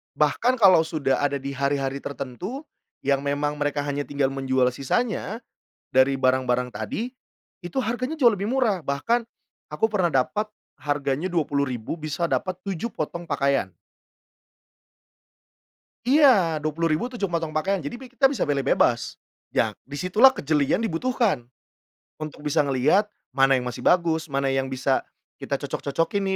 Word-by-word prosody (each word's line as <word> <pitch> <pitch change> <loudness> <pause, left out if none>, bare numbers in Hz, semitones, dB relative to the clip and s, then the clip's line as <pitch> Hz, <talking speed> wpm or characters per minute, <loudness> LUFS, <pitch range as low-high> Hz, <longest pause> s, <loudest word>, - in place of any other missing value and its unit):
bahkan 225 - +2
kalau 195 -8 +6
sudah 155 -4 0
ada 145 0 +1
di 140 0 -4
hari-hari 140 0 -1
tertentu 145 - -6 0.4
yang 140 0 +2
memang 145 +1 -1
mereka 145 0 0
hanya 145 0 -3
tinggal 140 -2 0
menjual 130 -2 +1
sisanya 220 - -2 0.5
dari 130 +1 +3
barang-barang 130 -1 +2
tadi, 225 - -4 0.6
itu 175 +9 -2
harganya 255 +6 -3
jauh 235 -5 +5
lebih 195 - -3
murah. 220 - +1
Bahkan 230 +13 0 0.5
aku 150 - -1
pernah 185 -6 +1
dapat 210 +11 0 0.2
harganya 145 +4 -2
Rp20.000 140 -5 -1
bisa 155 +2 -2
dapat 185 - 0
7 195 +4 -4
potong 170 +3 -4
pakaian. 140 - 0 2.3
Iya, 240 - +5
Rp20.000 160 +7 0
7 240 -5 -2
potong 170 -3 -2
pakaian 175 +5 0
jadi 145 +12 -5
pi 260 -1 -13
kita 265 +2 +4
bisa 275 - -1
pilih 140 -2 0
bebas. 120 -2 +1 0.3
Ya - - +1 0.2
di 145 - -5
situlah 215 - +6
kejelian 145 -1 +1
dibutuhkan. 190 - 0 0.7
Untuk 150 -1 -7
bisa 150 +1 +1
ngeliat 145 +9 +3 0.2
mana 135 0 +4
yang 125 - -1
masih 125 -1 -5
bagus, 165 -2 +2
mana 140 -1 0
yang 135 0 0
bisa 130 0 0 0.4
kita - - -2
cocok-cocokin 190 +7 -1
150 Hz, 140 wpm, -24 LUFS, 140-195 Hz, 2.3 s, kalau